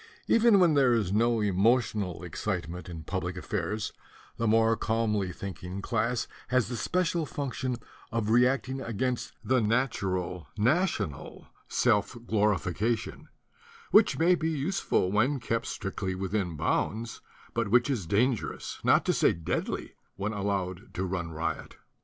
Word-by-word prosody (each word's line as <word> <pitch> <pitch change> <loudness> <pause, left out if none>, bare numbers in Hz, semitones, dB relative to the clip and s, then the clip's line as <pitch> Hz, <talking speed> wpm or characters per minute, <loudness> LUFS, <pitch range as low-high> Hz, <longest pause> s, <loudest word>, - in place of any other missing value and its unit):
Even 230 -3 +5
when 175 -4 +5
there 135 -4 +4
is 105 -5 +1
no 115 +1 +3
emotional 105 -3 +1
excitement 90 +1 -4
in 80 -2 -7
public - - -3
affairs, 105 0 -3 0.4
the 115 - 0
more 115 +1 +4
calmly 110 -4 0
thinking 90 0 -6
class 115 +4 -1 0.2
has 125 -3 +1
the 125 - -3
special 175 +5 0
function 130 -3 -3 0.4
of 110 -1 0
reacting 130 +2 +2
against 120 +2 -2
the 130 -1 +2
nat 115 +5 +1
ural 90 -4 -2
national 110 - 0 0.2
self 105 +4 +1
glorification, 105 +1 0 0.6
which - - +5
may 170 +4 +4
be 165 -2 0
useful, 155 - 0
when 125 +7 +2
kept 115 -1 -2
strictly 95 -1 -3
within 95 -3 -2
bounds, 110 +8 -1 0.3
but 115 -2 0
which 120 +5 +4
is 120 - -2
dangerous, 115 +5 0
not - - +4
to - - +2
say - - +4
deadly, 85 -1 -3 0.2
when 100 +3 -2
al 100 -1 -3
lowed 95 +1 -2
to 95 - -1
run 90 -2 -3
riot. 80 0 -4
110 Hz, 140 wpm, -29 LUFS, 95-125 Hz, 0.6 s, Even